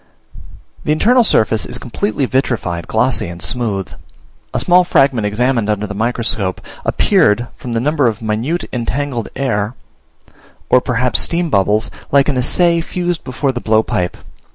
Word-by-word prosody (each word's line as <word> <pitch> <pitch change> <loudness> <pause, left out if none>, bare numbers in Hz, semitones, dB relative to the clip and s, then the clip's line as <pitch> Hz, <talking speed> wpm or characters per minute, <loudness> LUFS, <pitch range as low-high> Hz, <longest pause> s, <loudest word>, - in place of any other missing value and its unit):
The - - 0
internal 240 +11 +4
surface 110 - +2
is - - -4
completely 140 - -2
vitrified, 120 -10 -1
glossy, 125 +1 +1
and 85 0 -8
smooth. 105 -4 -1 0.6
A - - -1
small 180 0 +4
fragment 135 -10 +2
examined 115 +1 0
under 105 0 0
the 105 - -6
microscope 110 -3 -1 0.2
appeared, 115 +4 +2
from 120 - -6
the 115 - +1
number 145 +1 +1
of 110 - -1
minute 115 +10 -2
entangled 125 0 -2
air 115 -4 -1 1.0
or 125 - +6
perhaps 125 -2 +1
steam 170 -1 +1
bubbles, 105 +3 +2 0.2
like 140 0 +4
an 140 - 0
assay 170 +6 +2
fused 175 0 -3
before 135 +2 -1
the 120 -2 -5
blowpipe. 110 -5 0
120 Hz, 145 wpm, -16 LUFS, 110-140 Hz, 1.0 s, or